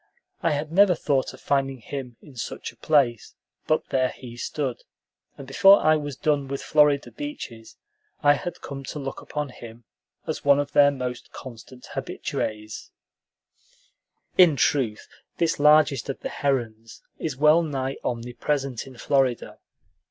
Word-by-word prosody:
I 165 - +2
had 150 +2 -3
never 190 +1 +5
thought 140 -4 0
of - - -14
finding 135 -1 0
him 125 0 -7
in 145 -4 -15
such 115 - -5
a - - -24
place; 130 -7 +1 0.3
but 155 - +1
there 130 -1 +2
he 120 -2 -10
stood, 130 +1 -3 0.6
and 140 - -9
before 195 +9 +6
I 155 0 +4
was 145 -3 -4
done 145 +1 0
with 140 0 -4
Florida 150 -2 +3
beaches 275 - -8 0.5
I 145 0 +7
had 175 +4 -5
come 135 -1 -7
to 150 - -6
look 135 -2 -5
upon 150 -1 -4
him 120 -1 -12 0.4
as - - -4
one 140 0 +5
of 145 0 -2
their 145 0 +6
most 125 -3 -5
constant 125 0 -11
habitués. 110 0 -4 1.5
In 175 -5 +7
truth, 125 -5 0 0.3
this 165 -3 0
largest 150 -2 +4
of 135 - -4
the - - -4
herons 115 -5 -3 0.2
is 150 -5 -3
well 155 +4 +5
nigh 135 -4 -3
omnipresent 125 +2 -2
in 130 -2 -13
Florida. 130 -2 0
140 Hz, 150 wpm, -25 LUFS, 125-150 Hz, 1.5 s, I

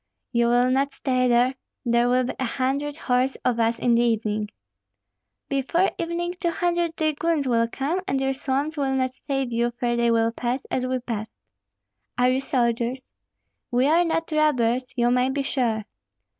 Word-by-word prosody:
"You 235 -1 +2
will 245 +1 +3
not 275 +1 +1
stay 255 -2 0
there, 245 +2 +3 0.3
there 235 0 +3
will 255 +1 +3
be 250 - -3
a - - 0
hundred 275 +4 -1
horse 255 -2 0
of 240 -2 +1
us 230 0 +2
in 240 0 +2
the 235 - +4
evening." 215 -3 0 1.0
"Before 275 +7 +1
evening 340 +1 -2
two 350 -3 0
hundred 345 -1 0
dragoons 310 -1 0
will 230 -2 +2
come, 285 +10 -2
and 270 - 0
your 270 0 0
swamps 275 +4 -2
will 270 -2 0
not 260 -1 0
save 270 -2 -3
you, 235 +1 +1
for 240 -1 0
they 235 0 +2
will 230 0 +2
pass 245 +3 -3
as 255 0 0
we 255 0 0
passed." 220 -3 -4 0.9
"Are 250 +1 +4
you 260 - +1
soldiers?" 245 -1 -1 0.6
"We 245 +2 +2
are 325 +4 +4
not 330 -1 -1
robbers, 255 -5 +1
you 240 0 +3
may 250 +1 +2
be 275 +1 -1
sure." 230 -6 -1
255 Hz, 175 wpm, -24 LUFS, 240-280 Hz, 1.0 s, the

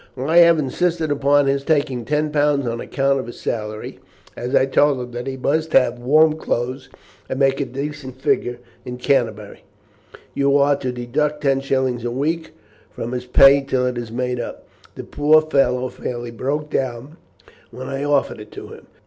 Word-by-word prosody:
"I 145 +6 +1
have 170 -1 +7
insisted 160 +2 -1
upon 145 0 +3
his 140 0 0
taking 140 -6 0
ten 150 0 0
pounds 145 -2 +1
on 115 0 -3
account 135 0 0
of 130 - -6
his 120 - -10
salary, 105 -1 -5 0.4
as 125 +1 -3
I - - +4
told 140 0 +2
him 125 0 -6
that 120 +1 -6
he 135 0 -4
must 155 +4 -1
have 125 -2 +3
warm 155 +5 +4
clothes 130 +1 -3 0.4
and - - -3
make 135 0 +2
a - - 0
decent 135 -1 -6
figure 120 -2 0 0.3
in 125 0 -7
Canterbury. 115 -6 -1 0.7
You 140 0 +2
are 140 0 +3
to 130 -2 -3
deduct 145 +5 -2
ten 135 -2 +1
shillings 130 -3 -1
a 120 - -1
week 155 +7 -2 0.4
from 115 - -6
his 125 0 -4
pay 135 +2 +6
till 130 -2 -1
it 125 0 -1
is 115 -2 -7
made 125 +1 -2
up. 120 - -7 0.3
The - - -7
poor 150 +2 +4
fellow 135 -5 +1
fairly 120 -1 -6
broke 145 +6 -3
down 130 +4 -3 0.5
when 130 +2 -8
I 135 +1 -3
offered 145 -5 0
it 105 - -11
to - - -9
him. - - -13
135 Hz, 185 wpm, -20 LUFS, 125-145 Hz, 0.7 s, have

